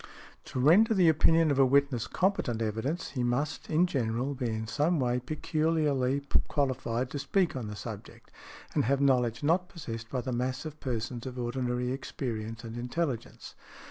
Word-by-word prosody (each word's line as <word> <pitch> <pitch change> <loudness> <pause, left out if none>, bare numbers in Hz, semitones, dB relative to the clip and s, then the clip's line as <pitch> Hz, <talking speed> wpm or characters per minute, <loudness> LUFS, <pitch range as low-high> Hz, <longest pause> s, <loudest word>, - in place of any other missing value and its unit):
To - - -4
render 200 - +5
the 180 -4 +5
opinion 160 0 +4
of 140 - +1
a 135 - +7
witness 140 -3 +2
competent 180 - 0
evidence, 115 - -2
he 130 - -2
must, 125 +6 -1
in 165 +3 +4
general, 130 -3 -1
be 130 -2 -3
in 110 0 -3
some 150 +9 +1
way 125 -1 +1
peculiarly 150 -1 0 0.3
qualified 130 -3 -1
to 145 - -3
speak 185 +3 +1
on 125 -5 -4
the 105 - -6
subject, 105 0 -9 0.4
and - - +2
have 135 +3 +2
knowledge 125 -3 +2
not 175 +4 +2
possessed 115 -9 -7
by 130 -1 -2
the 130 0 -3
mass 125 +4 -2
of 155 -1 -7
persons 120 0 -3
of 130 -1 -7
ordinary 125 0 -1
experience 115 -4 -4
and 115 0 -7
intelligence. 125 0 -3
130 Hz, 170 wpm, -29 LUFS, 120-150 Hz, 0.4 s, a